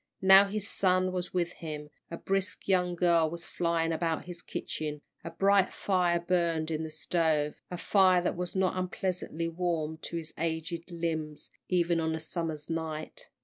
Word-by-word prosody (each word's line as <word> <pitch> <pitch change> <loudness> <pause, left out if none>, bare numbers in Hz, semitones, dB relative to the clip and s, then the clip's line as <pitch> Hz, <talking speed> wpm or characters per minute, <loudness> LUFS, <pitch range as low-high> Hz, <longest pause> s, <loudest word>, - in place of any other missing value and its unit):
Now 190 +1 +9
his 205 0 -3
son 185 -2 +2
was 180 -1 -3
with 175 -1 -1
him, 150 -2 -7 0.2
a 170 - -5
brisk 195 0 -2
young 180 -2 +2
girl 170 -2 +3
was 170 +1 -6
flying 170 -1 0
about 165 0 -1
his 175 -1 -8
kitchen, 150 -2 -4 0.2
a - - -5
bright 195 +3 +3
fire 180 -3 +1
burned 170 -2 0
in 160 0 -1
the 160 - -4
stove, 155 -1 0
a 180 - -4
fire 185 -1 +4
that - - 0
was 180 +1 -4
not 190 -1 +2
unpleasantly 185 -2 -2
warm 165 -2 -2
to 170 - -5
his 160 -1 -7
aged 165 +1 -3
limbs 160 -3 -4 0.2
even 170 -2 +2
on 160 0 0
this 160 0 -5
summer 165 -3 -2
night. 160 -1 -4
170 Hz, 170 wpm, -30 LUFS, 160-180 Hz, 0.2 s, Now